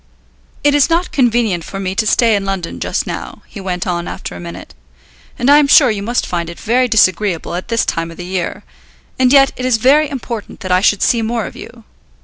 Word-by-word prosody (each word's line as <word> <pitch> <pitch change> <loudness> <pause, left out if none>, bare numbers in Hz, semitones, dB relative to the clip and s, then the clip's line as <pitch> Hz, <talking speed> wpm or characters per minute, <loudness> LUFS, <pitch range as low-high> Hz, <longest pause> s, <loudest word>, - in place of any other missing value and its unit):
"It 290 0 +4
is 290 +1 +3
not 335 +2 0
convenient 235 - +1
for 195 - -7
me 190 -1 -3
to 215 +2 -1
stay 230 -1 +3
in 200 - -1
London 195 -3 -4
just - - -2
now," - - -7
he 200 - -10
went 180 -1 -3
on 175 -1 -2
after - - -7
a - - -8
minute, 85 +1 -9 0.6
"and 245 - -1
I 290 +1 +7
am 295 - +3
sure 275 -3 +6
you 205 -2 -3
must 240 +4 -1
find 170 -2 -3
it 170 - -10
very 250 +3 +1
disagreeable 195 -6 +1
at 180 +1 -5
this 230 -1 0
time 165 0 -2
of 165 - -12
the 175 - -7
year; 185 +2 -4 0.6
and 255 -1 +4
yet 275 -1 +6
it 255 - -5
is 255 -3 +2
very 285 +6 +3
important 235 -5 -7
that 185 - -4
I 180 0 +3
should 205 0 +2
see 235 - +2
more 225 -1 -2
of - - -9
you. 230 0 -12
215 Hz, 230 wpm, -16 LUFS, 185-250 Hz, 0.6 s, I